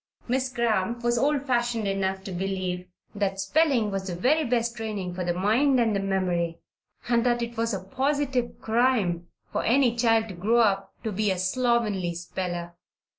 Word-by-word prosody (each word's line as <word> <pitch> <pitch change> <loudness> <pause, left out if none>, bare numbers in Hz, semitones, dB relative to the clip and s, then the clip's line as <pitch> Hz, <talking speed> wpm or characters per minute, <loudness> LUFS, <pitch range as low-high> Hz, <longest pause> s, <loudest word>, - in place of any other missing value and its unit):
Miss 260 +1 0
Cramp 235 -1 0
was 240 0 +2
old 280 +1 +1
fashioned 240 -4 0
enough 190 -1 -1
to 195 - -6
believe 185 -1 -3 0.3
that 195 -2 -1
spelling 235 +1 +2
was 195 0 -3
the 180 - -3
very 285 - +2
best 235 -3 0
training 210 -6 -4
for 180 0 -3
the 175 - 0
mind 245 +8 +3
and 225 -3 +2
the - - +1
memory 180 -4 0 0.5
and 235 -1 +3
that 240 -1 +1
it 235 0 -5
was 230 0 0
a 195 -3 -3
positive 265 +1 -1
crime 220 -7 +1 0.2
for - - -1
any 245 0 +3
child 225 -2 +3
to - - -6
grow 210 +7 +2
up 200 -3 +1
to 220 - -2
be 210 +1 0
a 190 - 0
slovenly 205 -3 0
speller. 175 0 -4
220 Hz, 175 wpm, -26 LUFS, 190-240 Hz, 0.5 s, mind